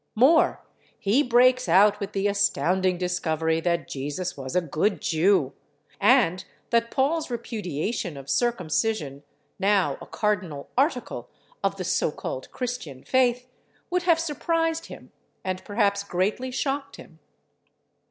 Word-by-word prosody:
More, 280 +9 +4 0.3
he 210 +8 +2
breaks 255 0 +4
out 205 +1 +5
with 200 -1 -5
the 195 0 -1
astounding 190 -2 +1
discovery 160 -3 0
that 170 -1 0
Jesus 145 +7 -4
was 130 -2 -6
a 180 - +4
good 165 +6 0
Jew, 165 -3 +2 0.5
and 205 -5 +4 0.3
that 230 0 +2
Paul's 300 +5 0
repudiation 210 - -3
of 135 0 -10
circumcision 180 - 0 0.4
(now 195 -8 +2
a - - -9
cardinal 185 -9 -2
article 265 -1 -1 0.3
of - - +1
the - - -3
so - - +1
called - - -6
Christian 235 - -5
faith) 250 -1 +2 0.4
would 360 0 +1
have 340 -2 +3
surprised 330 +1 -1
Him - - -12 0.3
and 185 0 -3
perhaps 200 -1 +1
greatly 200 +7 -1
shocked 275 +2 -2
Him. - - -14
205 Hz, 130 wpm, -25 LUFS, 175-250 Hz, 0.5 s, out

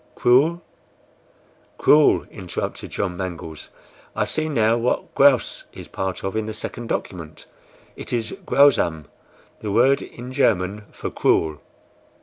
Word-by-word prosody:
CRUEL!" 155 +8 +3 1.1
"CRUEL!" 150 0 +5
interrupted 90 -4 -5
John 95 -3 -3
Mangles. 85 -4 -6 0.5
"I - - +1
see 155 0 -1
now 115 -5 +2
what 120 +1 -1
GRAUS 140 -3 +3
is - - -10
part 95 -1 -4
of 95 +2 -3
in 110 -1 -1
the 110 - -5
second 115 +2 -6
document. 80 -8 -5 0.5
It - - -8
is 115 -2 -2
GRAUSAM, 90 - +3 0.5
the 105 - -4
word 130 +6 +4
in 125 +2 -9
German 105 -6 +1
for - - -6
CRUEL!" 80 -2 +1
110 Hz, 130 wpm, -22 LUFS, 90-130 Hz, 1.1 s, CRUEL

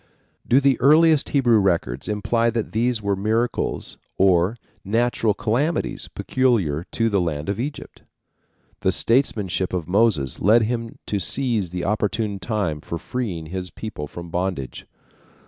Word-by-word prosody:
Do 125 - +5
the 135 -3 +2
earliest 155 +2 +5
Hebrew 120 -6 +4
records 85 - 0
imply 115 +3 +1
that 115 -1 -3
these 115 0 0
were 100 -1 +1
miracles 110 +5 -1 0.2
or 95 +3 +3 0.3
natural 115 0 +1
calamities 140 +12 -1
peculiar 100 - 0
to 115 - +1
the 100 -4 +1
land 80 -2 -3
of 100 - -2
Egypt? 145 +4 -6 0.8
The 95 - +1
statesmanship 105 -6 0
of 85 -4 -2
Moses 95 - +2
led 110 +4 +5
him 115 0 -3
to 100 - -1
seize 110 -1 0
the 90 0 -4
opportune 105 0 -1
time 95 -8 -2
for 85 - -5
freeing 95 -6 -4
his 90 +2 -5
people 80 -5 -7
from 85 +2 -9
bondage. 90 -7 -3
105 Hz, 140 wpm, -22 LUFS, 90-120 Hz, 0.8 s, Do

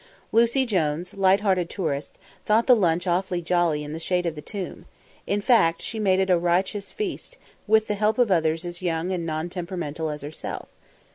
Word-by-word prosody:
Lucy 235 +4 +3
Jones, 175 -5 -1
lighthearted 190 -2 +2
tourist, 150 -7 -3 0.3
thought 220 +2 +3
the 250 - +7
lunch 175 -5 +1
awfully 180 0 0
jolly 170 -3 +1
in 150 +1 -6
the 160 - -5
shade 180 +1 0
of 170 - -1
the 150 - -8
tomb, 195 +2 -6 0.4
in 205 +1 0
fact, 170 -8 +4
she 225 - -4
made 190 -3 +3
it 190 -1 +2
a 175 - +4
riotous 185 +4 0
feast, 430 +4 -5 0.3
with 220 +1 +4
the 210 - -1
help 210 +1 +1
of 245 -5 +3
others 165 -1 +1
as 175 0 -5
young 170 0 -1
and 170 -3 -2
non 155 +1 -2
temperamental 170 -3 -4
as 150 -1 -6
herself. 150 +2 -6
180 Hz, 190 wpm, -25 LUFS, 165-205 Hz, 0.4 s, the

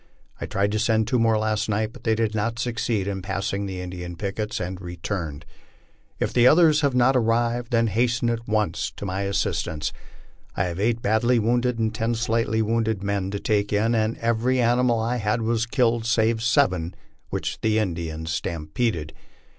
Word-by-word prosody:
I - - -4
tried 100 +1 0
to 110 - 0
send 110 -1 +2
two 125 +1 +1
more 115 -1 +3
last 110 0 -1
night, 110 +1 -1
but - - -14
they 110 -1 +3
did 110 -1 0
not 110 +2 -1
succeed 115 -4 -1
in 95 -1 -3
passing 100 +1 -2
the 95 -1 -5
Indian 90 -1 -6
pickets, 105 +4 -3
and 90 +1 -5
returned. 85 -3 -5 0.7
If - - -1
the 120 0 +5
others 155 +1 +5
have 140 -3 +1
not 125 +2 +4
arrived, 120 0 +1
then 115 -1 +3
hasten 115 +2 +1
at 115 0 -4
once 105 -1 0
to - - -6
my 95 0 -2
assistance. 80 -5 -1 0.6
I - - +2
have 90 0 -3
eight 115 +3 0
badly 115 +4 +3
wounded 120 +2 +1
and 110 -1 0
ten 115 +2 -1
slightly 115 -1 0
wounded 110 -2 0
men 100 -1 -1
to 100 +1 -3
take 100 -1 0
in, 110 +3 +2
and 110 0 0
every 115 +3 +1
animal 120 0 +3
I 115 +2 -1
had 110 +1 0
was 115 0 0
k 125 +2 +1
lied 115 -1 +1
save 110 -1 +2
seven 100 - +1 0.3
which - - -3
the 110 0 +2
Indians 80 -5 -2
stampeded. 85 +1 -2
110 Hz, 185 wpm, -24 LUFS, 100-115 Hz, 0.7 s, the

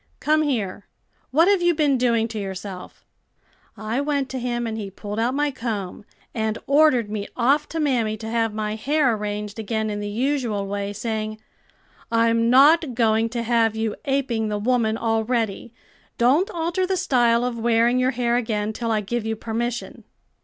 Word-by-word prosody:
'Come 310 +1 +2
here; 220 -10 -2 0.4
what 320 +7 +4
have 400 -2 +3
you 345 -1 +3
been 295 -3 +2
doing 235 -3 +2
to 220 -1 -5
yourself?' 190 -1 -7 0.7
I 220 +5 -2
went 285 -2 -1
to 260 - -4
him 240 -1 -2
and 225 -1 -3
he 210 -3 -5
pulled 205 +2 -6
out 240 +3 0
my 290 0 +1
comb, 215 -6 -5 0.3
and 220 -1 -1
ordered 275 -7 +3
me 205 -1 -3
off 280 +5 +2
to 325 - -4
mammy 240 -8 0
to 220 +1 -7
have 225 -1 0
my 210 0 -3
hair 265 +3 +1
arranged 210 0 -4
again 220 0 -2
in 205 - -3
the 205 0 -4
usual 235 -3 -1
way, 200 0 -3
saying, 215 0 -4 0.7
'I'm 230 0 +3
not 280 +2 +5
going 225 -1 +2
to 235 0 -3
have 230 -1 +2
you 220 -1 -2
aping 265 -5 0
the 210 -1 -2
woman 225 0 +1
already; 225 -1 -1 0.5
don't 275 +11 +3
alter 345 +2 -1
the 380 0 0
style 240 -8 +2
of 240 -2 -3
wearing 235 +2 +3
your 255 0 +2
hair 240 -2 0
again, 220 -3 -1
till 230 +1 -3
I 215 -1 +1
give 235 +3 -3
you 220 0 -2
permission.' 235 +2 -4
230 Hz, 175 wpm, -23 LUFS, 215-260 Hz, 0.7 s, not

